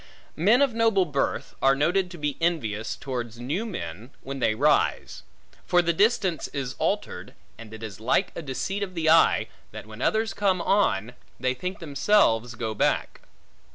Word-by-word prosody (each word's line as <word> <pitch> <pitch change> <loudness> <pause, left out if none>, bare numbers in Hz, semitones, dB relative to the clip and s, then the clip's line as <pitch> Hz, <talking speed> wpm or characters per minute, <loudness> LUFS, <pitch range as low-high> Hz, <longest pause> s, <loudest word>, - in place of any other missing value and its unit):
Men 215 - +4
of 270 -4 +1
noble 225 -4 +3
birth, 140 -4 -2
are 135 0 +4
noted 180 +6 +1
to 175 - -10
be 150 -2 -2
envious 115 -11 -1
towards 120 -4 -5
new 155 - -3
men, 105 - -6
when 135 0 -6
they 110 -3 +1
rise. 145 +6 +1 0.5
For 175 0 +4
the 170 0 +1
distance 200 -3 +1
is 135 -3 -4
altered, - - -2 0.2
and 115 -2 -11
it 110 0 -9
is 105 -4 -7
like 130 - +1
a - - -4
deceit 165 +8 -3
of 185 -2 -4
the 160 -1 +2
eye, 165 - +4 0.2
that - - -9
when 110 +2 -11
others 220 +3 +1
come 195 -3 +1
on, 125 - +1 0.3
they 130 +1 0
think 180 +9 -5
themselves, 140 - +2
go 110 -1 -3
back. 105 - 0
150 Hz, 170 wpm, -25 LUFS, 120-190 Hz, 0.5 s, Men